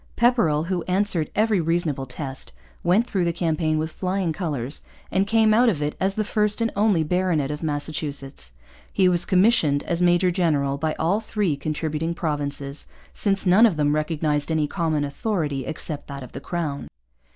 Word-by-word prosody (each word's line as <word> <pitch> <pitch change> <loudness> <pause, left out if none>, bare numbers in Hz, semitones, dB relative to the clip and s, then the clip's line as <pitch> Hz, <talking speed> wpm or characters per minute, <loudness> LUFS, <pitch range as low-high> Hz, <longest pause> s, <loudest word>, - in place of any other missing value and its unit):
Pepperrell, 230 -12 +3
who 180 0 -1
answered 185 -4 +1
every 215 -3 +2
reasonable 160 -5 -1
test, 135 +1 -6 0.3
went 195 +7 +3
through 195 -6 -1
the 170 - +1
campaign 160 -2 0
with 155 +1 -2
flying 185 -1 -1
colours 145 -7 -3 0.3
and 195 +1 +1
came 220 0 +4
out 240 +2 +5
of 180 -9 -1
it 150 0 -1
as 195 +1 +1
the 215 - 0
first 210 0 +1
and 230 0 0
only 200 -5 +3
baronet 165 -4 0
of 150 - -5
Massachusetts. 145 - -4 0.4
He 190 -2 +3
was 175 -1 +3
commissioned 180 -7 +3
as 170 0 -1
major 175 +1 +4
general 145 -6 0
by 155 0 -1
all 175 +6 +1
three 210 -7 -1
contributing 155 +3 -3
provinces, 145 -3 -3 0.3
since 195 -1 0
none 195 +6 +6
of 185 -8 -2
them 145 -1 +2
recognized 150 -1 0
any 160 -2 +1
common 160 -2 -1
authority 145 - -2
except 150 -1 -5
that 140 -1 -7
of 125 - -11
the 135 - -8
crown. 155 -5 -3
165 Hz, 175 wpm, -23 LUFS, 150-190 Hz, 0.4 s, none